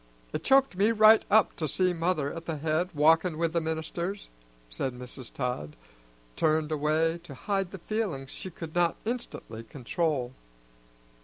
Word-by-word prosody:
It - - -3
choked 270 -5 +4
me 205 +4 +3
right 220 0 +7
up 215 -1 +4
to 155 - -1
see 180 +5 +1
mother 165 -4 0
at 165 0 -7
the 160 -2 -3
head, 160 +4 0
walkin' 160 +3 +4
with 165 0 0
the 170 - +1
ministers," 160 +4 -4 0.5
and 125 -2 -2
Mrs. 125 0 -8
Todd 125 - -3 0.6
turned 155 0 +1
away 155 +2 +1
to 155 -5 -11
hide 195 +5 -1
the 195 - -8
feelings 180 -9 -3
she 185 - -6
could 165 -2 -8
not 175 -1 +2
instantly 220 - -5
control. 130 +1 -2
165 Hz, 155 wpm, -28 LUFS, 145-185 Hz, 0.6 s, right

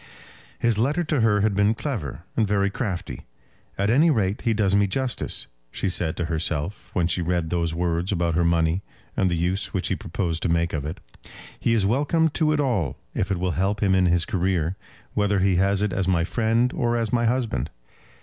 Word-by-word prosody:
His 115 -3 +1
letter 145 +9 +1
to 150 -5 0
her 105 -2 +3
had 105 0 +2
been 100 +3 +2
clever 105 - -4
and 110 - +2
very 100 -1 +1
crafty. 90 - -4 0.5
"At 100 +2 +1
any 150 +7 +5
rate 105 -7 +1
he 115 - +1
does 100 -3 +2
me 100 0 +3
justice," 125 +5 -1 0.3
she 95 - -1
said 85 -3 0
to 85 - -1
herself, 80 +2 -2
when 90 - +1
she 90 +1 +1
read 85 -1 -1
those 85 -2 0
words 85 +1 -1
about 85 -3 0
her 85 - +2
money, 85 +1 +2 0.3
and 95 - +2
the 85 - 0
use 90 +5 -1
which 95 - 0
he 95 - +1
proposed 90 -5 -3
to - - 0
make 85 0 +1
of 75 -3 -2
it. 80 - -6 0.6
"He 115 - +2
is 105 -4 +2
welcome 145 - +2
to 155 +1 +1
it 150 - +1
all 115 - 0 0.2
if 95 - -1
it 95 - 0
will 90 0 -1
help 100 +4 0
him 95 -2 +3
in 95 -1 +4
his 85 -1 +2
career, 90 -3 0 0.4
whether 105 -1 +1
he 95 -1 +2
has 100 +2 +2
it 105 -3 0
as 95 -1 0
my 85 -3 +2
friend 115 +5 +1
or 120 -7 0
as 115 -1 -2
my 120 -1 +2
husband." 120 -1 -1
95 Hz, 210 wpm, -24 LUFS, 85-115 Hz, 0.6 s, any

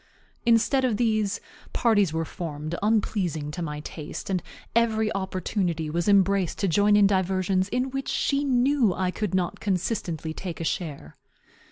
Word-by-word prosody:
Instead 235 +4 +4
of 240 -5 +1
these, 215 -3 +1 0.3
parties 205 -7 +3
were 160 0 -1
formed 155 -2 -5
unpleasing 195 -8 0
to 175 - -5
my 150 -3 -4
taste, 155 +5 -7
and 185 -2 0 0.3
every 220 -2 +2
opportunity 185 -4 -2
was 170 +3 -1
embraced 195 -2 +3
to 200 - 0
join 205 +4 +4
in 205 -1 +6
diversions 190 0 +1
in 250 +3 -1
which 270 0 -3
she 280 0 +1
knew 255 -5 +3
I 185 -1 0
could 205 -2 -2
not 180 -2 -1
consistently 180 -5 -2
take 175 0 -6
a - - -3
share. 150 - -4
190 Hz, 155 wpm, -26 LUFS, 170-220 Hz, 0.3 s, in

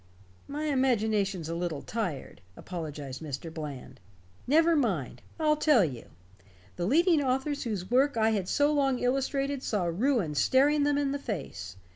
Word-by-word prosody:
"My 295 +2 -4
imagination's 220 - +1
a 165 - -3
little 170 -4 -3
tired," 180 - -4 0.2
apologized 150 -6 -6
Mr. 155 +2 -6
Bland. 150 -5 -7 0.5
"Never 325 +4 +4
mind. 195 - -1 0.2
I'll 305 -1 +3
tell 295 - +4
you. 125 -7 -6 0.7
The 175 0 -2
leading 330 - +4
authors 270 +2 -1
whose 205 -4 -4
work 265 +1 +3
I 220 0 +3
had 195 -4 -1
so 290 +1 +2
long 275 -3 +2
illustrated 275 +2 -1
saw 210 -7 -1
ruin 195 - 0
staring 285 - +3
them 290 0 +2
in 285 -1 0
the 280 - -2
face. 135 - -6
230 Hz, 150 wpm, -29 LUFS, 170-285 Hz, 0.7 s, Never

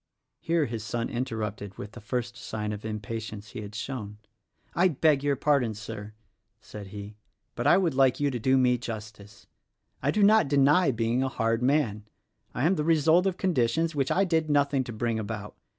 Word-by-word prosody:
Here 165 -2 +1
his 115 -3 -5
son 115 +1 -3
interrupted 105 -5 -4
with 105 - -7
the 120 - -11
first 120 +2 -3
sign 105 -2 -4
of 105 - -6
impa 110 0 -4
tience 110 -1 -8
he 120 - -7
had 105 0 -9
shown. 105 -3 -5 0.6
"I 180 +2 +4
beg 150 -3 +2
your 145 -1 +2
pardon, 135 -6 +1
Sir," 105 0 -8 0.5
said 105 -1 -10
he, 105 +1 -9 0.4
"but 120 +3 -2
I 175 - +6
would 175 -6 +1
like 130 -2 +3
you 145 -1 +1
to 125 - -3
do 130 +4 +3
me 125 -1 +3
justice. 110 -3 -8 0.6
I - - 0
do 210 - +2
not 215 -5 +5
deny 145 +4 +4
being 115 0 0
a 135 - 0
hard 115 -1 0
man. 125 -6 +1 0.5
I 125 - 0
am 185 +3 +3
the 150 - 0
result 165 +3 +4
of 185 -1 -1
conditions 165 -1 +1
which 135 -3 0
I 195 - +3
did 160 -3 0
nothing 140 -2 +2
to 120 - -6
bring 115 0 -1
about. 105 -1 -6
120 Hz, 195 wpm, -27 LUFS, 110-145 Hz, 0.6 s, I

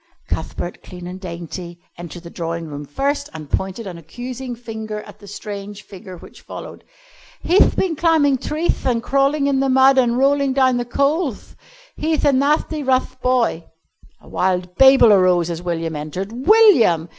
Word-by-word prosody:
Cuthbert, 175 - -5
clean 180 -1 -11
and 180 +1 -8
dainty, 175 0 -7 0.2
entered 175 0 -9
the 170 - -10
drawing 165 0 -4
room 145 -1 -7
first 280 - -2
and 155 -2 -8
pointed 190 +8 -3
an 180 -3 -7
accusing 245 - -7
finger 220 -2 -7
at - - -14
the 205 - -14
strange 205 0 -8
figure 190 -2 -11
which - - -15
followed. - - -10 0.6
"He'th 370 +4 +3
been 355 -4 0
climbing 295 -4 +2
treeth 315 +6 -2
an' 235 -2 +1
crawling 275 +3 +1
in 275 -1 +1
the 270 0 +1
mud, 265 +1 +5
an' 240 -2 +2
rolling 275 +1 +2
down 260 -2 +3
the 240 - -2
coalth. 280 - -1 0.4
He'th 310 0 0
a 285 - +4
nathty 300 +3 +1
rough 255 -1 -1
boy." 245 -10 +1 0.5
A - - -20
wild 180 -1 -1
babel 265 -5 +7
arose 180 -3 +3
as 170 0 -5
William 165 -2 -3
entered. 155 +6 -5
"_William! 255 - +4
230 Hz, 165 wpm, -20 LUFS, 180-275 Hz, 0.6 s, babel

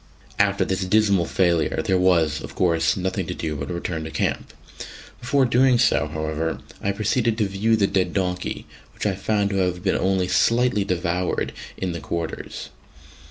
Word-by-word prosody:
After - - +2
this 95 0 -1
dismal 100 -2 +3
failure 85 -3 +1
there 95 -1 +2
was, 85 -5 +2
of - - -9
course, 85 -2 +2
nothing 95 -1 -2
to - - -4
do 80 -2 -3
but 70 0 -5
to 90 - -4
return 85 -2 -3
to - - -5
camp. - - -2 0.7
Before 130 +2 +2
doing 125 +1 +4
so, 115 - +3
however, 80 +1 -3 0.2
I 100 - 0
proceeded 110 +3 0
to 110 - +2
view 100 +4 +1
the 105 -3 +2
dead 95 -1 0
donkey, 90 -2 -2 0.3
which - - -5
I 100 - +2
found 100 +1 0
to 100 - -1
have 90 -1 0
been 95 - +1
only 95 -1 +1
slightly 115 +2 +2
devoured 90 -1 -1 0.2
it - - -3
the 85 - -4
quarters. 80 +2 -5
95 Hz, 175 wpm, -23 LUFS, 85-105 Hz, 0.7 s, doing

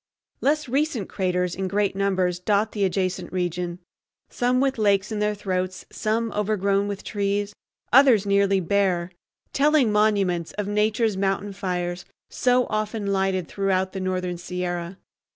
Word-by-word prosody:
Less 300 +1 +1
recent 270 - 0
craters 180 -2 -1
in 190 0 -3
great 200 0 0
numbers 190 -3 0
dot 205 +3 +1
the 205 - -1
adjacent 185 -1 -1
region, 175 -1 -2 0.5
some 250 +1 +1
with 270 -2 +1
lakes 200 0 +2
in 215 - -2
their 210 0 0
throats, 185 -2 -3
some 225 +1 -1
overgrown 200 -1 0
with 200 -1 -5
trees, 205 0 -1 0.4
others 250 -6 +6
nearly 200 -1 +3
bare—telling 200 - 0
monuments 200 -5 +1
of 210 -1 -3
Nature's 210 0 +1
mountain 195 +1 -1
fires 180 -2 -3 0.3
so 250 0 +2
often 215 -1 -1
lighted 190 -2 0
throughout 190 -1 0
the 190 - -4
northern 185 -1 -2
Sierra. 175 0 -4
200 Hz, 135 wpm, -24 LUFS, 185-215 Hz, 0.5 s, others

